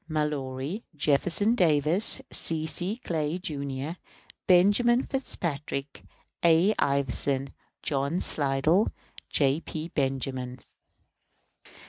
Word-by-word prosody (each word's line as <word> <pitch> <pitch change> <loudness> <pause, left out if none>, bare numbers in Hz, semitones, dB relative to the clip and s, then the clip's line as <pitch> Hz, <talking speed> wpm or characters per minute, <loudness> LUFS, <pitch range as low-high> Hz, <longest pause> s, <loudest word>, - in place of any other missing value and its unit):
MALLORY, 150 - -2
JEFFERSON 165 +9 +2
DAVIS, 170 - +3
C. 160 -1 +1
C. 180 +6 -3
CLAY, 160 0 -1
Jr., 140 -1 -4 0.5
BENJAMIN 205 +7 +5
FITZPATRICK, 150 - -3 0.4
A. 170 +5 +5
IVERSON, 140 -1 0 0.3
JOHN 140 +4 0
SLIDELL, 150 +8 +2 0.4
J. 140 +1 +2
P. 160 0 -6
BENJAMIN. 130 -3 -2
150 Hz, 80 wpm, -27 LUFS, 140-175 Hz, 0.5 s, BENJAMIN